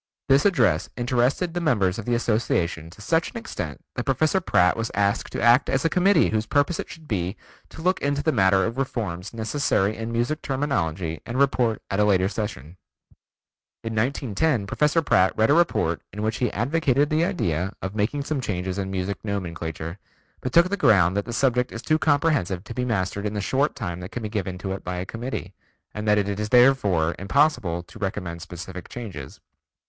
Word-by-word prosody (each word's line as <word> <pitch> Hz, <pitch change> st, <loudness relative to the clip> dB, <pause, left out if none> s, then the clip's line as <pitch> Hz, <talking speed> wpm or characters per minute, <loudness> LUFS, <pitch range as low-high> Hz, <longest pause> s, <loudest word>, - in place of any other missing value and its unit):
This 135 Hz, +5 st, +5 dB
address 190 Hz, -5 st, +2 dB
interested 125 Hz, +8 st, +1 dB
the 175 Hz, -, -2 dB
members 105 Hz, -, +1 dB
of 110 Hz, -, -6 dB
the 120 Hz, -, +1 dB
Association 90 Hz, -8 st, 0 dB
to 90 Hz, -, -15 dB
such 165 Hz, +7 st, +1 dB
an 245 Hz, -, -8 dB
extent 85 Hz, -, -6 dB
that -, -, -3 dB
Professor 155 Hz, +5 st, +1 dB
Pratt 90 Hz, -, +3 dB
was 115 Hz, 0 st, -2 dB
asked 100 Hz, +1 st, 0 dB
to -, -, -3 dB
act 120 Hz, +3 st, +5 dB
as 135 Hz, +4 st, 0 dB
a 165 Hz, -, +2 dB
committee 185 Hz, -1 st, +4 dB
whose 110 Hz, 0 st, -1 dB
purpose 145 Hz, +6 st, +1 dB
it -, -, -5 dB
should 160 Hz, -2 st, -12 dB
be 95 Hz, -3 st, -2 dB, 0.3 s
to 160 Hz, -, -10 dB
look 185 Hz, +1 st, +1 dB
into 140 Hz, 0 st, 0 dB
the 160 Hz, -, +2 dB
matter 95 Hz, -5 st, +3 dB
of 115 Hz, +4 st, -3 dB
reforms 100 Hz, -9 st, -3 dB
necessary 110 Hz, -3 st, 0 dB
in 115 Hz, +1 st, -5 dB
music 120 Hz, +7 st, -1 dB
terminology 90 Hz, -, -2 dB
and 120 Hz, -, -5 dB
report 120 Hz, -5 st, +2 dB
at 100 Hz, -, 0 dB
a -, -, +5 dB
later 95 Hz, -2 st, +3 dB
session. 95 Hz, -7 st, -5 dB, 1.1 s
In 115 Hz, 0 st, -4 dB
1910 120 Hz, +1 st, 0 dB
Professor 150 Hz, +9 st, +1 dB
Pratt 95 Hz, -9 st, +3 dB
read 110 Hz, +5 st, +4 dB
a -, -, +6 dB
report 145 Hz, -, +2 dB
in 105 Hz, +2 st, -5 dB
which 110 Hz, 0 st, -1 dB
he 125 Hz, -, 0 dB
advocated 140 Hz, +3 st, +1 dB
the 155 Hz, +2 st, +3 dB
idea 95 Hz, -, -1 dB
of 95 Hz, +1 st, -3 dB
making 110 Hz, +7 st, -1 dB
some 145 Hz, -1 st, -2 dB
changes 95 Hz, -3 st, -3 dB
in 95 Hz, -1 st, -3 dB
music 95 Hz, 0 st, -3 dB
nomenclature, 85 Hz, -3 st, -4 dB, 0.4 s
but 130 Hz, -, -3 dB
took 170 Hz, +5 st, +5 dB
the 200 Hz, -, -1 dB
ground 95 Hz, -, +4 dB
that 100 Hz, -, -1 dB
the -, -, -6 dB
subject 125 Hz, 0 st, +1 dB
is 115 Hz, -, -7 dB
too 155 Hz, +3 st, +2 dB
comprehensive 145 Hz, -, +1 dB
to 115 Hz, -, -8 dB
be 125 Hz, +2 st, -2 dB
mastered 100 Hz, -2 st, -1 dB
in 105 Hz, -, -4 dB
the -, -, -1 dB
short 135 Hz, +8 st, 0 dB
time 90 Hz, -5 st, -4 dB
that 90 Hz, +1 st, -7 dB
can 120 Hz, -, -5 dB
be 105 Hz, -, -3 dB
given 95 Hz, -4 st, -3 dB
to 95 Hz, +1 st, -5 dB
it 95 Hz, -, -5 dB
by 90 Hz, -, -4 dB
a 90 Hz, +1 st, -3 dB
committee, 120 Hz, +5 st, -5 dB, 0.4 s
and 105 Hz, 0 st, -5 dB
that 105 Hz, 0 st, +4 dB
it 100 Hz, 0 st, -1 dB
is 105 Hz, 0 st, -2 dB
therefore 105 Hz, -11 st, +4 dB
impossible 100 Hz, -, +1 dB
to 100 Hz, -, -14 dB
recommend 90 Hz, -4 st, -4 dB
specific 90 Hz, +2 st, -8 dB
changes. 95 Hz, -, -8 dB
110 Hz, 200 wpm, -24 LUFS, 95-140 Hz, 1.1 s, a